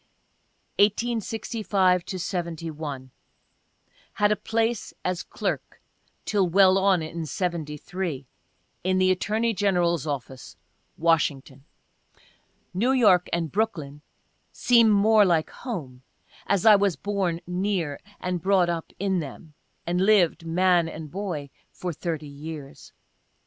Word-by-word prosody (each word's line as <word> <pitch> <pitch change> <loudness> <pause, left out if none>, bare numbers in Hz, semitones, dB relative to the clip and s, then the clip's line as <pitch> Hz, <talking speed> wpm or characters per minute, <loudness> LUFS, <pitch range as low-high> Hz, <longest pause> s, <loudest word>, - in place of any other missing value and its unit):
1865 210 -3 +1
to 185 - -5
'71. 160 -7 -5 0.5
— - - -36
Had 205 0 +2
a - - +4
place 225 +1 -2
as 180 -1 -1
clerk - - -4 0.5
(till 195 -4 +1
well 190 +1 +5
on 190 -3 +3
in 165 +1 -5
'73) 165 -2 -4 0.6
in 185 +1 +1
the 185 0 +4
Attorney 220 +5 0
General's 175 -6 +1
Office, 135 -2 -6 0.4
Washington. 145 -4 0 1.1
(New 235 +9 +2
York 200 -9 +4
and 165 -3 -1
Brooklyn 160 -9 -2 0.5
seem 235 -2 +4
more 210 +1 +5
like 170 -5 +1
home, 150 - -7 0.5
as 200 -3 +1
I 215 -1 +9
was 200 -3 +2
born 190 0 -2
near, 180 -4 -2 0.2
and 180 -1 -3
brought 190 -2 +3
up 165 -1 -3
in 190 -1 0
them, 150 +1 -8 0.3
and 175 +1 0
lived, 180 -5 +3
man 175 0 +3
and 155 -2 -8
boy, 175 -8 -4 0.2
for 180 -2 -5
30 160 -1 -4
years. 145 0 -9
180 Hz, 120 wpm, -25 LUFS, 160-200 Hz, 1.1 s, I